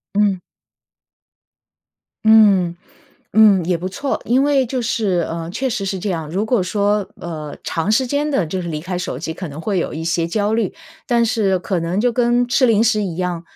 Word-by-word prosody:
嗯。 200 -3 +2 1.8
嗯 205 -6 +5 0.6
嗯， 205 -4 +6
也 175 +1 +1
不 180 +3 -4
错， 270 +9 -3
因 250 +3 +3
为 280 -2 +2
就 250 +1 -2
是， 205 -7 0
呃， 165 0 -5
确 265 +8 -2
实 220 -4 -2
是 190 0 -2
这 200 +3 -3
样， 165 -4 -3
如 195 +5 -1
果 220 -2 +1
说， 205 +2 0
呃， 155 -3 -6
长 165 +5 -1
时 255 +4 +2
间 290 +4 -1
地 270 -10 +1
就 185 +4 -3
是 175 - -5
离 155 -2 -3
开 180 +2 -4
手 155 -7 -4
机 160 +2 -4
可 180 +1 -7
能 145 +1 -9
会 195 +2 -1
有 - - -2
一 160 +1 -5
些 165 0 0
焦 205 +4 -1
虑， 220 -3 0 0.3
但 235 -2 +2
是 215 -5 +1
可 180 0 -2
能 170 +3 -2
就 240 +3 +2
跟 240 +1 +2
吃 255 +2 +3
零 225 -1 +3
食 215 -2 +2
一 180 -5 -4
样， 180 -2 -2
200 Hz, 215 characters per minute, -19 LUFS, 175-230 Hz, 1.8 s, 嗯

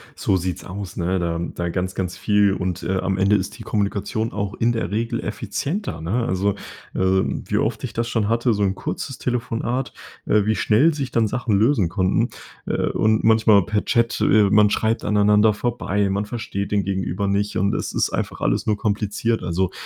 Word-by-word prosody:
So 95 - +1
sieht's 90 0 -3
aus, 100 0 -7
ne, 90 +2 0
da 85 -1 -1
da 85 0 -3
ganz 90 +1 -3
ganz 90 -2 -3
viel 105 -1 +3
und, 90 -2 -3
äh, 95 +3 -1
am 95 0 -1
Ende 100 +2 +3
ist 100 -1 -2
die - - -9
Kommunikation 105 +2 -1
auch 100 -2 -3
in 115 +1 +1
der 115 -3 -2
Regel 115 +2 -1
effizienter, 135 - -4
ne, 110 +9 -1
also, 95 +2 +1 0.4
äh, - - -2 0.2
wie - - -2
oft - - -1
ich - - -4
das 115 0 -1
schon 110 -4 0
hatte 115 +1 +2
so 105 -1 0
'n 95 -1 +1
kurzes 135 +6 -5
Telefonat 120 +1 -2 0.3
äh, 105 -2 +3
wie 110 +1 +2
schnell 135 +12 +3
sich 140 -4 -4
dann 115 -2 +2
Sachen 110 -2 0
lösen 110 - +3
konnten, 90 +2 +1 0.4
äh, - - 0
und 110 0 +2
manchmal 110 -3 +5
per 105 -1 0
Chat, 115 -1 +1
äh, 105 -2 +4
man 105 0 +5
schreibt 110 +2 0
aneinander 105 +1 +4
vorbei 105 -3 -1
man 100 +2 -1
versteht 105 -3 -4
den 100 -1 +2
gegenüber 95 0 -2
nicht 100 +1 0
und 100 +2 +1
es - - -3
ist - - +1
einfach - - -4
alles - - 0
nur 105 -1 +1
kompliziert 105 +2 -1
also, 90 +2 0
105 Hz, 195 wpm, -22 LUFS, 95-115 Hz, 0.4 s, manchmal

